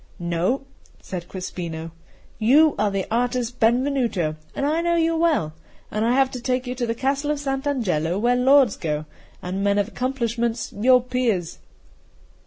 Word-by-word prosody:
"No," 175 +10 -1 0.3
said 175 -2 -7
Crespino, 170 -3 -6 0.5
"you 285 +8 +5
are 210 - +2
the 195 -1 -2
artist 245 +1 -1
Benvenuto, 235 - +1 0.2
and 280 - -1
I 310 +3 +1
know 340 0 +1
you 330 0 +2
well, 320 - +1 0.4
and 215 +1 -1
I 235 +2 +2
have 265 0 +3
to 250 - -6
take 250 +1 -1
you 250 - -3
to 250 -2 -3
the 230 - -1
Castle 275 +4 -1
of 300 -1 0
Sant' 270 0 -2
Angelo, 180 - 0
where 240 +4 +2
lords 260 -2 +5
go, 150 -2 -3 0.4
and 185 +2 -3
men 200 0 +2
of 205 -1 +1
accomplishments, 235 -2 -2
your 250 +4 +4
peers." 240 -9 -1
240 Hz, 165 wpm, -23 LUFS, 195-270 Hz, 0.5 s, you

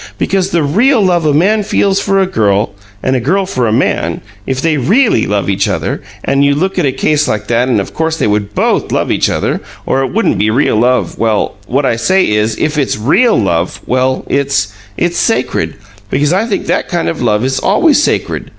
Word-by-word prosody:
" - - -30
Because 190 - 0
the 170 -5 +1
REAL 225 - +3
love 175 -4 +1
a - - +3
man 195 +9 +2
feels 195 -1 +1
for 195 0 +1
a 190 - +3
girl 105 - 0 0.3
and 130 - +1
a - - +1
girl 185 +11 0
for 130 -10 -1
a - - 0
man, 95 -8 0 0.3
if 130 -1 -1
they 160 +2 +1
REALLY 185 - +2
love 100 -3 -1
each 100 0 0
other, - - -2 0.2
and, 140 +1 +1
you 140 0 +3
look 190 +5 -1
at 155 - +2
a - - +1
case 150 +3 0
like 105 -1 -2
that, 120 +2 +1
of 105 -6 -1
course 160 0 -1
they - - 0
would 105 -1 -1
BOTH - - 0
love - - 0
each - - +1
other, - - -1 0.2
or 135 - 0
it 135 - -2
wouldn't 225 +3 0
be 105 - +2
real 115 -1 +1
love 125 +3 +1
well, 110 -2 0
what 135 +3 0
I 115 - +1
say 185 +12 +2
is, 105 +1 0
if 155 0 -1
it's 135 - -1
REAL 185 - +3
love, 85 -4 -1
well, 130 +1 0
it's 140 -8 0 0.3
it's 175 0 0
sacred, 225 - 0 0.3
because 145 - +1
I 210 +5 +1
think 210 - -2
that - - -1
kind 175 -2 -1
of 165 - -3
love 110 -1 +1
is 135 0 -1
always 285 - +3
sacred. - - -1
140 Hz, 220 wpm, -13 LUFS, 110-185 Hz, 0.3 s, REAL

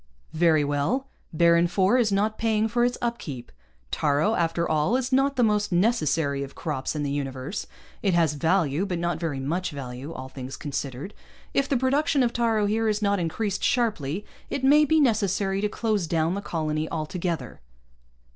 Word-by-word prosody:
"Very 160 -2 +3
well. 145 - 0 0.3
Baron 170 +1 +4
IV 190 +7 +2
is 220 -4 +2
not 210 +2 0
paying 220 -1 +2
for 240 +2 +1
its 245 0 +1
upkeep. 165 - -4 0.4
Taaro, 150 +8 +1
after 170 -2 0
all, 155 +8 +1
is 260 0 -1
not 270 +1 +3
the 250 - +2
most 210 -2 +1
necessary 165 - +1
of 140 0 -7
crops 150 -2 -3
in 150 - -2
the 140 - -2
universe. 135 +5 -4 0.3
It 195 -4 +1
has 165 -3 +3
value, 165 +2 +1
but 180 -3 -2
not 170 -1 -1
very 160 -5 -2
much 170 +7 -2
value, 135 -1 -7
all 130 -4 -7
things 130 0 -8
considered. 140 +4 -5 0.4
If 275 0 +1
the 275 - +2
production 275 +2 +2
of 235 -1 0
taaro 225 -3 +1
here 220 +2 +1
is 210 0 -1
not 200 -1 +2
increased 195 +4 -2
sharply, 210 - 0 0.2
it 270 - -3
may 295 +3 +6
be 315 +2 +3
necessary 200 - +1
to 210 - 0
close 210 -6 -1
down 165 +1 +1
the 200 - -3
colony 155 -4 -2
altogether." 160 - -4
180 Hz, 175 wpm, -25 LUFS, 150-220 Hz, 0.4 s, may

